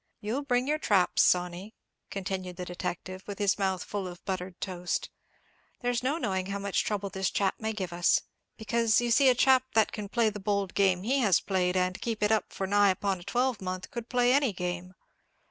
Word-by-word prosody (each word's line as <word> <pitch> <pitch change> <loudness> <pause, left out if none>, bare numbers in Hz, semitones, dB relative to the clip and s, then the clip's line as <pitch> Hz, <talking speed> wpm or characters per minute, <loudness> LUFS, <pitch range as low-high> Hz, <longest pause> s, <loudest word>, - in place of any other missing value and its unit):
"You'll 225 +7 -2
bring 250 -2 0
your 305 +1 +1
traps, 195 -10 +3
Sawney," 180 +4 +1 0.3
continued 185 -2 -4
the 180 0 -6
detective, 180 +1 -5
with 200 -2 -5
his 205 -1 +1
mouth 190 -2 0
full 200 -2 -4
of 175 -1 -10
buttered 185 -1 -4
toast; 180 -2 -3 0.7
"there's 245 -1 0
no 270 +5 0
knowing 190 - -2
how 200 0 -3
much 200 -1 0
trouble 200 -2 -2
this 190 0 -1
chap 195 -2 +1
may 220 0 -2
give 190 -5 -4
us; 175 0 +3 0.4
because 225 0 +2
you 240 0 0
see 270 +3 +6
a 250 - +4
chap 260 0 +5
that 220 -1 +4
can 210 -2 -6
play 230 -1 +2
the 210 - -7
bold 200 -1 -1
game 190 -2 +2
he 265 +6 +1
has 200 -8 +4
played, 185 -1 0
and 185 +1 0
keep 225 -3 -2
it 210 - +3
up 220 - +1
for 195 - -3
nigh 205 +1 +4
upon 190 0 0
a - - -11
twelvemonth, 200 -4 -2
could 235 -1 -6
play 245 0 +3
any 275 -4 +3
game. 180 0 -4
200 Hz, 205 wpm, -29 LUFS, 185-230 Hz, 0.7 s, see